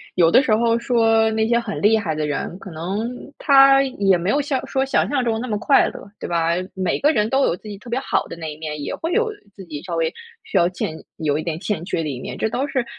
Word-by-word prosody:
有 170 Hz, -2 st, +4 dB
的 260 Hz, -, +7 dB
时 215 Hz, -6 st, +2 dB
候 230 Hz, +1 st, +2 dB
说 225 Hz, -2 st, +3 dB
那 220 Hz, 0 st, +1 dB
些 235 Hz, 0 st, +3 dB
很 220 Hz, -3 st, -5 dB
厉 220 Hz, +2 st, +5 dB
害 165 Hz, -8 st, -2 dB
的 155 Hz, -1 st, -1 dB
人， 150 Hz, +4 st, -3 dB
可 190 Hz, -, -10 dB
能 190 Hz, +9 st, -3 dB, 0.3 s
他 275 Hz, -1 st, +6 dB
也 200 Hz, -8 st, +2 dB
没 175 Hz, +3 st, -2 dB
有 285 Hz, -, +2 dB
像 275 Hz, -2 st, -2 dB
说 265 Hz, 0 st, 0 dB
想 270 Hz, -, +1 dB
象 275 Hz, -3 st, 0 dB
中 225 Hz, -1 st, 0 dB
那 255 Hz, -, -4 dB
么 210 Hz, -2 st, -1 dB
快 275 Hz, -, +4 dB
乐， 200 Hz, -, -11 dB
对 -, -, -4 dB
吧？ 170 Hz, -1 st, +1 dB, 0.2 s
每 185 Hz, -1 st, -1 dB
个 295 Hz, +2 st, +4 dB
人 215 Hz, -5 st, +1 dB
都 270 Hz, +2 st, +2 dB
有 170 Hz, -, +1 dB
自 215 Hz, -, -14 dB
己 205 Hz, -1 st, -7 dB
特 240 Hz, -, -12 dB
别 245 Hz, +3 st, 0 dB
好 -, -, -1 dB
的 -, -, -7 dB
那 160 Hz, -2 st, -5 dB
一 -, -, -13 dB
面， 150 Hz, -2 st, -5 dB
也 -, -, -4 dB
会 330 Hz, +2 st, -4 dB
有 455 Hz, +2 st, +2 dB, 0.2 s
自 190 Hz, -, -11 dB
己 150 Hz, -3 st, -7 dB
稍 175 Hz, -2 st, -4 dB
微 165 Hz, 0 st, 0 dB, 0.3 s
需 -, -, -2 dB
要 175 Hz, +1 st, +4 dB
欠 160 Hz, -3 st, -4 dB, 0.2 s
有 150 Hz, -2 st, 0 dB
一 155 Hz, -, -3 dB
点 165 Hz, -1 st, -3 dB
欠 205 Hz, -4 st, -3 dB
缺 175 Hz, -2 st, -2 dB
的 155 Hz, -, -3 dB
一 130 Hz, -3 st, -4 dB
面， -, -, -6 dB
这 220 Hz, -, 0 dB
都 265 Hz, +5 st, -1 dB
是， 260 Hz, -4 st, -1 dB
210 Hz, 295 characters per minute, -21 LUFS, 170-250 Hz, 0.3 s, 的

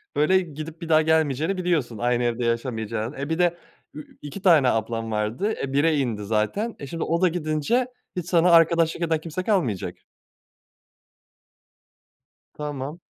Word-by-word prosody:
böyle, 170 Hz, +6 st, +4 dB
gidip 160 Hz, -1 st, -7 dB
bir 165 Hz, -, -6 dB
daha 155 Hz, -1 st, +5 dB
gelmeyeceğini 160 Hz, +2 st, +1 dB
biliyorsun. 165 Hz, -11 st, -1 dB
Aynı 120 Hz, +2 st, +1 dB
evde 120 Hz, 0 st, -1 dB
yaşamayacağını, 115 Hz, 0 st, -2 dB
eee, 140 Hz, +2 st, -4 dB
bir 160 Hz, +1 st, -1 dB
de 175 Hz, -1 st, +2 dB, 0.4 s
ü 150 Hz, -, -11 dB
2 150 Hz, +7 st, -8 dB
tane 165 Hz, -9 st, +5 dB
ablan 115 Hz, 0 st, -2 dB
vardı, 110 Hz, -, -1 dB
e, 135 Hz, -, -3 dB
1'e 155 Hz, +3 st, +3 dB
indi 115 Hz, -7 st, -1 dB
zaten, 110 Hz, -, -1 dB
e, 140 Hz, -, -7 dB
şimdi 165 Hz, +4 st, -4 dB
o 170 Hz, +2 st, 0 dB
da 185 Hz, -, +5 dB
gidince 165 Hz, -, 0 dB, 0.3 s
hiç 180 Hz, -3 st, -3 dB
sana 175 Hz, 0 st, +4 dB
arkadaşlık 165 Hz, 0 st, +4 dB
eden 160 Hz, -1 st, +1 dB
kimse 165 Hz, +3 st, -5 dB
kalmayacak. 165 Hz, -, -1 dB, 2.6 s
Tamam. 150 Hz, +1 st, -5 dB
155 Hz, 150 wpm, -24 LUFS, 120-170 Hz, 2.6 s, daha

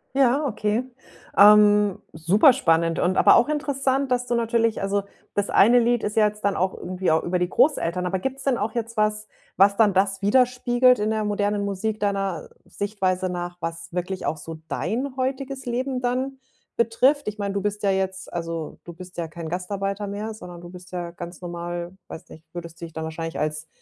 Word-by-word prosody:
Ja, 275 Hz, +2 st, +3 dB
okay. 215 Hz, -2 st, -1 dB, 0.5 s
Ähm, 210 Hz, -1 st, +6 dB
super 190 Hz, -, +5 dB
spannend 165 Hz, -8 st, +2 dB
und 185 Hz, +1 st, +1 dB
aber -, -, +7 dB
auch 240 Hz, +5 st, +4 dB
interessant, 275 Hz, -3 st, 0 dB
dass 250 Hz, 0 st, +1 dB
du 245 Hz, -1 st, -1 dB
natürlich 230 Hz, -2 st, +1 dB
also, 200 Hz, +1 st, 0 dB, 0.3 s
das 205 Hz, 0 st, 0 dB
eine 235 Hz, +5 st, +6 dB
Lied 240 Hz, 0 st, +1 dB
ist 210 Hz, -, -2 dB
ja 215 Hz, -1 st, +5 dB
jetzt 210 Hz, 0 st, -7 dB
dann 200 Hz, -1 st, +1 dB
auch 185 Hz, +1 st, 0 dB
irgendwie 185 Hz, -1 st, -2 dB
au 160 Hz, -, +3 dB
über 180 Hz, +1 st, 0 dB
die 180 Hz, 0 st, 0 dB
Großeltern, 180 Hz, -, +2 dB
aber 190 Hz, +1 st, 0 dB
gibt's 265 Hz, +6 st, -4 dB
denn 265 Hz, -3 st, +1 dB
auch 215 Hz, +1 st, -2 dB
jetzt 230 Hz, -1 st, -4 dB
was, 215 Hz, 0 st, 0 dB, 0.3 s
was 200 Hz, +1 st, +5 dB
dann 210 Hz, -4 st, +4 dB
das 195 Hz, 0 st, +1 dB
widerspiegelt 250 Hz, +3 st, +3 dB
in 215 Hz, +1 st, 0 dB
der 215 Hz, -1 st, 0 dB
modernen 205 Hz, 0 st, 0 dB
Musik 205 Hz, +2 st, -2 dB
deiner 195 Hz, -5 st, -2 dB, 0.2 s
Sichtweise 190 Hz, -3 st, -2 dB
nach, 175 Hz, 0 st, -5 dB
was 165 Hz, +1 st, -6 dB
wirklich 180 Hz, +1 st, -3 dB
auch 155 Hz, -, -1 dB
so 160 Hz, +2 st, -8 dB
dein 255 Hz, +8 st, -2 dB
heutiges 265 Hz, +1 st, -3 dB
Leben 250 Hz, +1 st, -2 dB
dann 260 Hz, +2 st, -2 dB, 0.4 s
betrifft? 250 Hz, +5 st, +2 dB
Ich 210 Hz, 0 st, -3 dB
meine, 200 Hz, -1 st, -2 dB
du 200 Hz, -, -1 dB
bist 205 Hz, 0 st, -3 dB
ja 200 Hz, -, +3 dB
jetzt 190 Hz, 0 st, -2 dB
also, 165 Hz, -2 st, -5 dB
du 170 Hz, -, -8 dB
bist 180 Hz, +1 st, -12 dB
ja 170 Hz, -, -2 dB
kein 160 Hz, 0 st, -7 dB
Gastarbeiter 195 Hz, +3 st, -3 dB
mehr, 210 Hz, +2 st, -4 dB
sondern 175 Hz, -5 st, -10 dB
du 175 Hz, -, -10 dB
bist 180 Hz, 0 st, -13 dB
ja 175 Hz, -2 st, -4 dB
ganz 175 Hz, 0 st, -9 dB
normal, 175 Hz, 0 st, -5 dB
weiß 160 Hz, -, -10 dB
nicht, 160 Hz, -, -13 dB
würdest 170 Hz, -1 st, -8 dB
du -, -, -4 dB
dich 165 Hz, -, -12 dB
dann 160 Hz, -, -5 dB
wahrscheinlich 165 Hz, +1 st, -5 dB
als 155 Hz, +1 st, -2 dB
200 Hz, 200 wpm, -24 LUFS, 175-235 Hz, 0.5 s, aber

